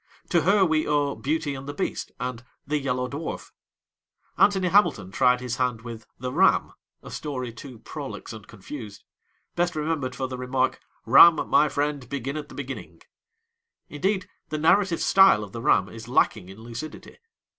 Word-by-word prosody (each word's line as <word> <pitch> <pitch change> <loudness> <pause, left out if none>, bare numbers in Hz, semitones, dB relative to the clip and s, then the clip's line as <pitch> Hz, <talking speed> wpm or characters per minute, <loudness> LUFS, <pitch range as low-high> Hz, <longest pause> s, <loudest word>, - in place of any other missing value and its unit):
To 170 - +3
her 195 +4 +4
we 155 -2 +1
owe 145 -1 +1
Beauty 150 +1 -2
and 135 0 -8
the 145 - -6
Beast 190 - -3
and 125 -2 -4 0.2
The 150 +2 -1
Yellow 125 -2 -1
Dwarf. 145 +5 -6 0.8
Anthony 190 -1 +3
Hamilton 190 - +2
tried 125 +3 +3
his 125 -1 -4
hand 125 -3 -1
with 115 -2 -9
The 125 0 -5
Ram, - - +3 0.3
a - - -10
story 130 -6 -5
too 125 +1 -10
prolix 140 +1 -8
and 110 -2 -11
confused, 105 0 -9 0.5
best 175 0 0
remembered 150 -4 -2
for 130 0 -3
the 130 -1 -7
remark, 130 +1 0 0.3
'Ram, 160 +8 +7
my 150 - +4
friend, 145 -4 -2
begin 135 +1 -4
at 150 -1 -6
the - - -12
beginning!' 135 -1 -8 0.9
Indeed, 185 +5 -1 0.2
the 155 - -2
narrative 170 +3 +3
style 190 - +5
of 100 - -9
the 115 - -6
Ram 95 -4 +3
is 115 +1 -10
lacking 110 -6 +1
in 100 +3 -12
lucidity! 120 - -9
135 Hz, 165 wpm, -25 LUFS, 125-155 Hz, 0.9 s, Ram